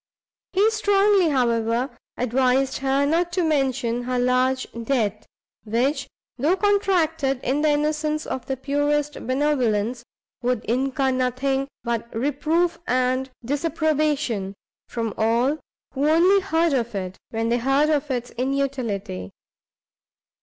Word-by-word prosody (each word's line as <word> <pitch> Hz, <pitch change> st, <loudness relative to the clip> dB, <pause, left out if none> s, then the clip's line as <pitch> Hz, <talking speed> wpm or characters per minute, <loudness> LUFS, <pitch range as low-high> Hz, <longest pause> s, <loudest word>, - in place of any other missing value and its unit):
He 410 Hz, +4 st, +4 dB
strongly, 405 Hz, -4 st, +3 dB
however, 235 Hz, -1 st, +1 dB, 0.2 s
advised 255 Hz, +2 st, +1 dB
her 275 Hz, +1 st, +1 dB
not 335 Hz, +4 st, +1 dB
to 360 Hz, 0 st, +1 dB
mention 265 Hz, -6 st, 0 dB
her 250 Hz, 0 st, -1 dB
large 255 Hz, +1 st, +2 dB
debt, 230 Hz, -3 st, -1 dB, 0.4 s
which, 240 Hz, +7 st, 0 dB, 0.3 s
though 310 Hz, +8 st, +3 dB
contracted 345 Hz, -9 st, +1 dB
in 275 Hz, +4 st, 0 dB
the 310 Hz, -, +3 dB
innocence 300 Hz, +1 st, 0 dB
of 260 Hz, -, -5 dB
the 265 Hz, -, -2 dB
purest 290 Hz, +2 st, 0 dB
benevolence, 250 Hz, -4 st, 0 dB, 0.4 s
would 245 Hz, -2 st, -1 dB
incur 265 Hz, +3 st, 0 dB
nothing 260 Hz, +2 st, 0 dB, 0.2 s
but 235 Hz, 0 st, -2 dB
reproof 305 Hz, +7 st, 0 dB
and 255 Hz, +1 st, +1 dB, 0.2 s
disapprobation, 290 Hz, -, 0 dB, 0.3 s
from 230 Hz, -2 st, -3 dB
all 235 Hz, +7 st, +2 dB, 0.3 s
who 285 Hz, +2 st, +1 dB
only 360 Hz, +5 st, +5 dB
heard 335 Hz, -4 st, +1 dB
of 235 Hz, -4 st, -1 dB
it, 185 Hz, -1 st, -4 dB
when 225 Hz, 0 st, -1 dB
they 240 Hz, +1 st, +2 dB
heard 275 Hz, +5 st, +2 dB
of 295 Hz, -1 st, 0 dB
its 245 Hz, -2 st, -3 dB
inutility. 250 Hz, -, -2 dB
270 Hz, 120 wpm, -23 LUFS, 245-305 Hz, 0.4 s, only